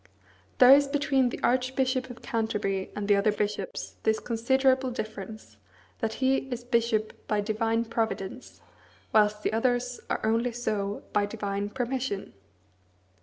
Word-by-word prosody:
There 250 Hz, +1 st, +8 dB
is 285 Hz, 0 st, +5 dB
between 280 Hz, -3 st, +2 dB
the -, -, -6 dB
Archbishop 255 Hz, +1 st, +1 dB
of 245 Hz, -1 st, -11 dB
Canterbury 210 Hz, -5 st, -1 dB
and 205 Hz, -1 st, -3 dB
the 205 Hz, -, +5 dB
other 200 Hz, +2 st, +3 dB
bishops 205 Hz, -2 st, -3 dB
this 220 Hz, 0 st, +2 dB
considerable 260 Hz, +3 st, +2 dB
difference, 215 Hz, -, -7 dB, 0.4 s
that 220 Hz, -, -1 dB
he 265 Hz, +2 st, +2 dB
is 245 Hz, -1 st, -4 dB
bishop 235 Hz, -3 st, +1 dB
"by 210 Hz, -, +1 dB
divine 225 Hz, +2 st, 0 dB
providence," 225 Hz, 0 st, -3 dB, 0.5 s
whilst 210 Hz, -1 st, +3 dB
the -, -, 0 dB
others 245 Hz, +1 st, 0 dB
are -, -, -1 dB
only 230 Hz, +2 st, +1 dB
so 205 Hz, -4 st, -2 dB
"by 205 Hz, 0 st, +2 dB
divine 205 Hz, -1 st, -3 dB
permission." 245 Hz, -3 st, -3 dB
225 Hz, 135 wpm, -28 LUFS, 210-255 Hz, 0.5 s, There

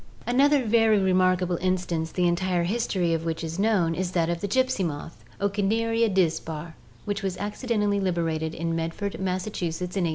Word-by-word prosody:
Another 275 Hz, +2 st, +3 dB
very 225 Hz, -1 st, +4 dB
remarkable 185 Hz, -2 st, +2 dB
instance 180 Hz, -3 st, -1 dB
the 180 Hz, -1 st, +1 dB
entire 175 Hz, 0 st, +1 dB
history 185 Hz, -3 st, 0 dB
of 165 Hz, 0 st, -1 dB
which 165 Hz, 0 st, -3 dB
is 165 Hz, +2 st, -4 dB
known 195 Hz, -6 st, +2 dB
is 180 Hz, +1 st, -3 dB
that 170 Hz, -1 st, +1 dB
of 170 Hz, -, -3 dB
the 205 Hz, -, -1 dB
gypsy 260 Hz, -1 st, +1 dB
moth 160 Hz, 0 st, -5 dB, 0.2 s
(Ocneria 225 Hz, +3 st, +1 dB
dispar) 165 Hz, -3 st, -1 dB, 0.3 s
which 205 Hz, 0 st, -2 dB
was 190 Hz, -2 st, -2 dB
acci 210 Hz, +5 st, -5 dB
dentally 210 Hz, -3 st, +1 dB
liberated 165 Hz, -3 st, -1 dB
in 165 Hz, 0 st, -2 dB
Medford, 165 Hz, +5 st, -3 dB
Massachusetts, 180 Hz, -2 st, -3 dB
in 190 Hz, -3 st, +1 dB
1869. -, -, +1 dB
185 Hz, 170 wpm, -26 LUFS, 170-205 Hz, 0.3 s, very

